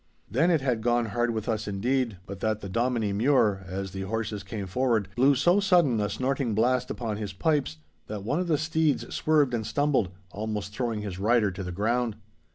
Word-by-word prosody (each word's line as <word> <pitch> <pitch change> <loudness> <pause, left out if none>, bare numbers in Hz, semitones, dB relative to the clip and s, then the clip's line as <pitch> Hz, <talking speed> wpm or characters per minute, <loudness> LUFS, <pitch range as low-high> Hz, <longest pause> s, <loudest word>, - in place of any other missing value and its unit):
Then 140 - +2
it 165 -5 +3
had 125 -4 0
gone 120 +1 +2
hard 120 0 +1
with 110 -1 -3
us 110 -2 -1
indeed, 115 +2 0
but 100 -1 -8
that 110 0 -1
the - - -6
Dominie 115 -1 0
Mure, 105 -3 +3
as 95 +1 -4
the 95 +1 -5
horses 105 +1 -3
came 100 +1 -5
forward, 110 0 0
blew 135 +3 +4
so 175 +9 +4
sudden 175 - +3
a 105 0 0
snorting 130 +1 -1
blast 125 +3 +2
upon 110 -4 -3
his 105 -2 -5
pipes, 140 - 0 0.3
that 105 -2 -5
one 145 - 0
of 180 - -1
the 160 -3 +2
steeds 155 0 0
swerved 150 -5 +2
and 115 -2 0
stumbled, 130 -1 +1 0.2
almost 105 -1 -4
throwing 115 -2 -2
his 95 -3 -5
rider 110 0 +3
to 95 - -7
the 90 - -5
ground. 115 +4 0
115 Hz, 200 wpm, -27 LUFS, 105-130 Hz, 0.3 s, blew